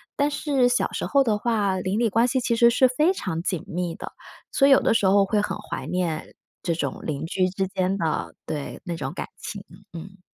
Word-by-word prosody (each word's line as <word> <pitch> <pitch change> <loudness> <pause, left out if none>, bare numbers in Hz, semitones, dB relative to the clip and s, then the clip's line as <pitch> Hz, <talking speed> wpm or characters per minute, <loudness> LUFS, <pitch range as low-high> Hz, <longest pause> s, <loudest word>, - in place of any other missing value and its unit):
但 285 +1 +2
是 275 -4 +2
小 245 - +1
时 - - -3
候 280 -1 +3
的 215 -4 +1
话， 210 -4 0
邻 185 +3 -1
里 235 -2 +2
关 230 +4 +3
系 260 +1 +1
其 235 -1 0
实 235 +1 +6
是 255 +2 +4
非 300 +9 +2
常 180 - -3
紧 175 -2 -2
密 175 0 -3
的， - - -8 0.4
所 275 - +4
以 - - +5
有 270 - +8
的 - - +3
时 210 - +2
候 195 +1 +5
会 205 +1 +1
很 - - -3
怀 - - -6
念 175 -4 -2 0.3
这 170 -1 0
种 170 - -3
邻 150 0 -3
居 185 +2 +1
之 190 +1 -2
间 190 +1 -1
的 160 -4 -2
对， 145 -2 -5
那 175 -2 -4
种 - - -4
感 - - -5
情， - - -7 0.3
嗯。 195 +4 -9
195 Hz, 245 characters per minute, -24 LUFS, 180-245 Hz, 0.4 s, 有